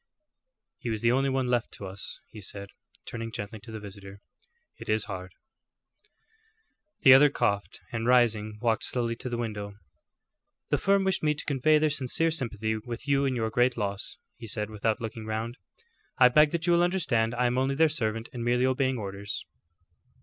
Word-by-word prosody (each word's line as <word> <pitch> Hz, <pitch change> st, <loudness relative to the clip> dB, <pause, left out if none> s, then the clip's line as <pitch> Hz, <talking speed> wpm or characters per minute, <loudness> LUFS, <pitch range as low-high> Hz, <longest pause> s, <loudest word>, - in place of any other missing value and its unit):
"He 120 Hz, -, -4 dB
was 110 Hz, -1 st, -2 dB
the 115 Hz, -, +4 dB
only 135 Hz, +2 st, +2 dB
one 130 Hz, -1 st, 0 dB
left 120 Hz, -2 st, 0 dB
to 100 Hz, -, -8 dB
us," 95 Hz, +1 st, -7 dB
he 110 Hz, -, -10 dB
said, 100 Hz, +1 st, -5 dB, 0.4 s
turning 115 Hz, 0 st, -5 dB
gently 105 Hz, +1 st, -6 dB
to 110 Hz, +3 st, -12 dB
the 110 Hz, -, -6 dB
visitor. 100 Hz, -1 st, -10 dB, 0.6 s
"It -, -, -9 dB
is 110 Hz, 0 st, +2 dB
hard." 95 Hz, -1 st, -6 dB, 1.7 s
The 135 Hz, -, +9 dB
other 145 Hz, +2 st, +8 dB
coughed, 100 Hz, -7 st, -1 dB
and 115 Hz, -1 st, -2 dB
rising, 110 Hz, -4 st, +3 dB
walked 115 Hz, -2 st, +1 dB
slowly 120 Hz, -2 st, -1 dB
to 125 Hz, -, -5 dB
the 120 Hz, -, -2 dB
window. 105 Hz, -3 st, -4 dB, 0.9 s
"The -, -, +2 dB
firm 195 Hz, 0 st, +3 dB
wished 190 Hz, -1 st, +1 dB
me 150 Hz, -1 st, +2 dB
to 150 Hz, -, -5 dB
convey 150 Hz, +2 st, +3 dB
their 155 Hz, 0 st, +2 dB
sincere 150 Hz, +4 st, +1 dB
sympathy 110 Hz, -7 st, -1 dB
with 120 Hz, +4 st, -7 dB
you 140 Hz, 0 st, +3 dB
in 130 Hz, -1 st, 0 dB
your 110 Hz, -2 st, -1 dB
great 120 Hz, +1 st, +2 dB
loss," 100 Hz, -2 st, -3 dB, 0.2 s
he 120 Hz, -1 st, -9 dB
said, 105 Hz, 0 st, -2 dB
without 110 Hz, +1 st, -1 dB
looking 110 Hz, -1 st, -6 dB
round. 110 Hz, +2 st, -3 dB, 0.6 s
"I 125 Hz, -1 st, +7 dB
beg 150 Hz, +4 st, +5 dB
that 170 Hz, +1 st, -2 dB
you 175 Hz, -, +4 dB
will 170 Hz, -, +4 dB
understand 135 Hz, -11 st, +1 dB
I 125 Hz, +1 st, +1 dB
am 125 Hz, +1 st, +1 dB
only 135 Hz, +1 st, +1 dB
their 160 Hz, +3 st, +5 dB
servant 115 Hz, -6 st, -2 dB
and 120 Hz, -2 st, -4 dB
merely 125 Hz, +1 st, +2 dB
obeying 130 Hz, 0 st, +1 dB
orders." 100 Hz, -1 st, -5 dB
120 Hz, 185 wpm, -28 LUFS, 110-135 Hz, 1.7 s, The